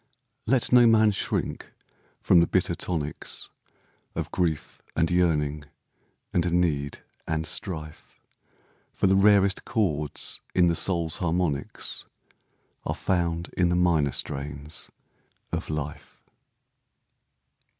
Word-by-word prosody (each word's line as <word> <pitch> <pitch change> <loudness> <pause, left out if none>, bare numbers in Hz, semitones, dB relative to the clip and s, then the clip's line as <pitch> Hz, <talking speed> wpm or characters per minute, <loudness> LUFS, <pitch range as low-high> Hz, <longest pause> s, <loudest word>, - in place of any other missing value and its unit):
Let 125 +1 +3
no 125 -1 +7
man 110 -1 +5
shrink 100 - -2 0.5
from 90 - +5
the 85 - +4
bitter - - +1
tonics 75 -5 -3 0.6
Of - - -4
grief, 85 -4 -2
and 80 0 +1
yearning, 75 -4 +1 0.7
and 85 0 +1
need, 75 -5 0 0.2
and 80 0 -1
strife, 80 -2 -4 0.8
For - - 0
the 95 0 +4
rarest 100 -1 +4
chords 75 - -1
in 90 - +5
the 85 -1 +2
soul's 85 -3 +2
harmonics 85 -5 -2 0.8
Are - - -2
found 85 -2 -1
in 90 -1 +2
the 90 - +1
minor 85 -5 +2
strains 75 +2 -3 0.6
of - - -3
life. 75 -1 -6
85 Hz, 110 wpm, -26 LUFS, 75-90 Hz, 0.8 s, no